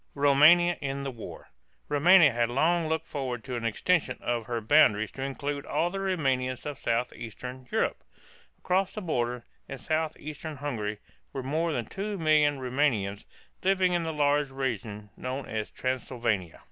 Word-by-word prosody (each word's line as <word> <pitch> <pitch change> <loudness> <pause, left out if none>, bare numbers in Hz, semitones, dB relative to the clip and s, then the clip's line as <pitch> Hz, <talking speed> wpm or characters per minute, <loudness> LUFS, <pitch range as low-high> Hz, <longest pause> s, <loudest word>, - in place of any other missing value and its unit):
ROUMANIA 150 +5 +5
IN 140 0 -3
THE 135 - -3
WAR. 115 -3 -10 0.4
Roumania 160 +2 +6
had 120 0 +1
long 160 +6 +2
looked 160 0 -1
forward 130 -5 -4
to 130 -2 -5
an 120 - -4
extension 125 +4 +1
of 120 -2 -2
her 120 -2 -1
boundaries 110 -3 +4
to 135 - -8
include 140 +1 -3
all 175 +1 0
the 195 - -4
Roumanians 135 -10 -1
of 145 -2 -5
southeastern 125 +2 -4
Europe. - - -1 0.5
Across 190 +1 0
the 215 - -4
border, 125 - -2 0.2
in 135 - -5
southeastern 155 +1 -3
Hungary, 110 -7 -3 0.4
were 135 - -4
more 160 +5 0
than 120 -6 -2
two 200 - -4
million 155 -3 +3
Roumanians 125 -7 0 0.4
living 185 -1 +2
in 175 - +1
the 165 -1 -2
large 145 -1 +2
region 110 -6 -4
known 130 +2 -4
as 110 -1 -4
Transylvania. 120 -8 -2
135 Hz, 155 wpm, -28 LUFS, 120-160 Hz, 0.5 s, Roumania